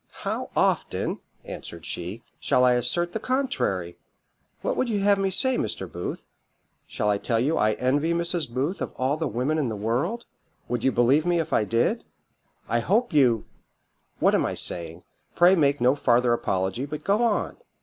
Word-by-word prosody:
"How - - -2
often," - - 0 0.3
answered 85 -1 -8
she, 95 +7 -6 0.2
"shall 125 - +3
I 125 - +5
assert 125 +9 +1
the 220 - -3
contrary? 250 - -1 0.6
What - - 0
would 255 - 0
you 205 -3 0
have 200 0 +3
me 195 0 +1
say, 255 +7 +1
Mr. 95 - -3
Booth? 90 +1 -6 0.6
Shall 105 - -2
I 100 - 0
tell 115 +1 0
you 145 +7 +1
I 110 0 +3
envy 145 +8 +1
Mrs. 170 -3 -1
Booth 135 +10 -2
of - - -4
all 130 +3 0
the 160 0 -2
women 130 +7 -1
in 135 -5 0
the 110 - -3
world? 125 - -2 0.4
would 120 0 -2
you 135 - +3
believe 130 +6 +3
me 175 -1 +2
if 165 - -3
I 105 - +3
did? 115 +2 +1 0.6
I 120 - +1
hope 215 - +1
you 125 -7 +3 0.7
what - - +3
am - - +3
I - - -2
saying? 85 0 -4 0.3
Pray 175 +2 +6
make 145 -5 +2
no 125 +2 +4
farther 125 -3 +3
apology, 95 +3 -1
but 150 +1 -6
go 205 +3 +2
on." 230 -3 0
130 Hz, 180 wpm, -25 LUFS, 115-175 Hz, 0.7 s, Pray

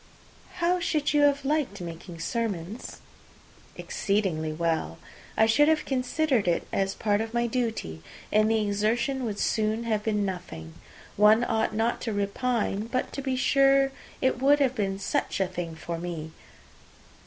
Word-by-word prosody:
"How 360 0 +1
should 305 -4 0
you 295 - +4
have 285 -1 +3
liked 285 -8 0
making 170 0 -8
sermons?" 215 -3 -4 0.7
"Exceedingly 190 -7 -1
well. 160 - -1 0.4
I 220 - +6
should 260 +7 +4
have 315 -1 +2
considered 260 - 0
it 170 - +1
as 195 0 0
part 205 -1 +1
of 225 +1 -5
my 235 0 +2
duty, 225 - -2 0.3
and 215 +1 +4
the 225 0 +2
exertion 230 +6 0
would 210 -3 -3
soon 220 +2 0
have 220 -2 0
been 210 -1 0
nothing. 175 - -6 0.4
One 215 +3 +6
ought 220 -2 0
not 225 +2 0
to 225 - -2
repine; 210 +1 -1
but, 255 +2 -2
to 275 - -4
be 265 -1 -1
sure, 275 +1 +4 0.3
it 260 -1 +1
would 285 +2 +5
have 265 -3 +2
been 195 -5 -1
such 195 - -1
a 190 - +3
thing 175 -3 -5
for 165 +1 -5
me! 165 -2 -5
220 Hz, 155 wpm, -27 LUFS, 195-255 Hz, 0.7 s, I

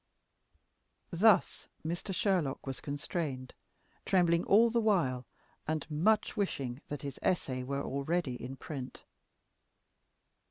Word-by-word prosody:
Thus 195 +3 +3 0.2
Mr. 175 +4 -3
Sherlock 180 -7 0
was 135 -1 -5
constrained, 145 -3 -4 0.5
trembling 170 -2 +3
all 225 +3 +5
the 235 0 +2
while, 145 - +1 0.4
and 155 -1 -1
much 210 +11 +2
wishing 140 - -2
that 145 -2 -5
his 140 -2 -6
essay 130 -8 0
were 140 +2 -2
already 140 +1 -1
in 125 +2 -6
print. 135 -1 -7
155 Hz, 110 wpm, -32 LUFS, 135-185 Hz, 0.5 s, all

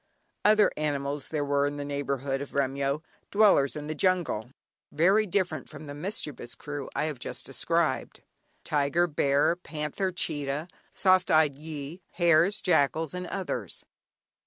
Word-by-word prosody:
Other 210 0 +5
animals 145 -1 -2
there 150 -2 -2
were 140 0 +2
in 145 0 -4
the 145 - -4
neighbourhood 140 -1 -2
of 140 - -8
Remyo, 140 +2 0 0.3
dwellers 200 -10 +4
in 150 -1 -5
the 155 - -3
jungle, 175 - 0 0.4
very 195 +8 +3
different 175 -6 -1
from 155 0 -9
the 145 - -7
mischievous 150 - -4
crew 145 -2 -6
I - - +1
have 155 -5 -3
just - - -5
described. - - -1 0.4
Tiger, 145 +4 +2
bear, 145 0 +2
panther, 170 +2 -3
cheetah, 150 -2 -2 0.2
soft 185 -1 +3
eyed 155 -2 +4
gyee, 150 +3 -7
hares, 170 +3 +3
jackals, 160 -2 +2
and 180 0 -4
others. 190 - -4
150 Hz, 140 wpm, -28 LUFS, 140-175 Hz, 0.4 s, Other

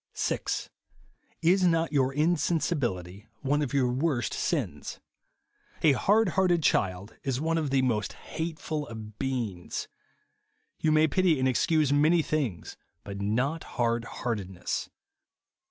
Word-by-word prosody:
6. - - -2 0.7
Is 185 +3 +4
not 165 -2 +2
your 135 -2 +3
insensibility 140 - 0
one 145 +2 +1
of 140 -3 -1
your 130 -3 +2
vjorst 130 -3 0
sins. - - -2 0.8
A 155 - +7
hard 205 - +3
hearted 175 -2 +2
child 95 -4 0
is 130 -2 -1
one 165 +2 +1
of 150 -3 -1
the 135 -1 +2
most 110 -5 0
hateful 160 -2 -4
of 110 -2 -9
beings. 120 -10 -3 0.9
You 155 - +2
may 155 +1 +5
pity 180 -1 +3
and 130 0 +2
excuse 150 +2 +2
many 155 +3 +4
things, 130 - -2 0.3
but 100 0 -6
not 130 +10 0
hard 115 -1 +1
heartedness. 100 -7 -3
140 Hz, 125 wpm, -28 LUFS, 115-160 Hz, 0.9 s, A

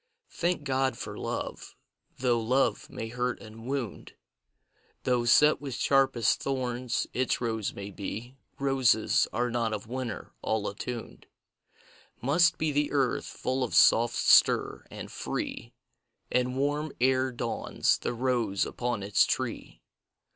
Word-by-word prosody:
Thank 175 -3 -1
God 130 -3 0
for - - -6
Love: - - -5 0.4
though 125 -2 +2
Love 120 0 +1
may 115 - -6
hurt 125 +1 -2
and 115 +1 -11
wound 135 -5 -4 0.9
Though 125 -1 +1
set 150 +6 +5
with 135 -4 -5
sharpest 135 -3 +2
thorns 125 -2 -1
its 130 0 0
rose 110 -3 -2
may 100 0 -7
be, 110 +6 -6 0.2
Roses 135 -5 +3
are 120 +2 -1
not 115 -2 0
of 105 0 -4
winter, 120 -2 -5
all 110 -2 -1
attuned 115 +3 -6 0.9
Must 155 +7 +3
be 155 -1 0
the 145 +1 0
earth, 135 -4 +1
full 130 0 -2
of 125 - -3
soft 120 +1 +5
stir, - - +4
and - - -8
free - - -4 0.6
And 125 +1 +1
warm 145 +2 -1
ere 130 +1 +2
dawns 120 -1 0
the - - -3
rose 115 -6 0
upon 120 -4 -3
its 100 +1 +4
tree. - - -3
125 Hz, 135 wpm, -28 LUFS, 115-135 Hz, 0.9 s, set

